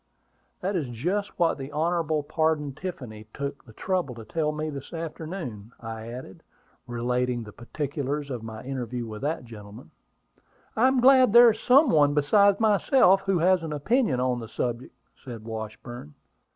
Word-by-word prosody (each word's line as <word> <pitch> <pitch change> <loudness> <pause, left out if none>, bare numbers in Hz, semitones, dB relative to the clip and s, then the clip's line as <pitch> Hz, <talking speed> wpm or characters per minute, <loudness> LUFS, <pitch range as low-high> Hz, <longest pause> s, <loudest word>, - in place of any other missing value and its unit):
"That 195 +2 -2
is 150 -8 -2
just 180 - -3
what 170 -4 +1
the 135 +2 -7
Hon. 160 -1 0
Pardon 155 -2 0
Tiffany 125 - -7
took 140 0 -5
the 110 - -16
trouble 180 - -2
to 115 -1 -10
tell 155 +5 -1
me 155 +1 -4
this 140 +2 -8
afternoon," 160 - -6
I 110 -1 -7
added, 120 -5 -9 0.5
relating 120 0 -1
the 105 - -10
particulars 140 +3 -4
of 125 -3 -4
my 110 -1 -8
interview 125 -2 -4
with 110 -1 -8
that 145 -2 -2
gentleman. 105 -6 -12 0.8
"I 235 +4 +4
am 265 -1 +2
glad 255 -3 +6
there 235 0 +9
is 220 - -7
some 265 +4 +5
one 145 -2 +4
besides 200 +7 +4
myself 210 -2 +4
who 195 -2 +2
has 180 +2 +3
an 160 -2 -5
opinion 150 - +1
on 125 -1 0
the 115 -2 -8
subject," 120 +1 -4 0.3
said 120 -5 -8
Washburn. 110 - -8
145 Hz, 165 wpm, -26 LUFS, 120-180 Hz, 0.8 s, there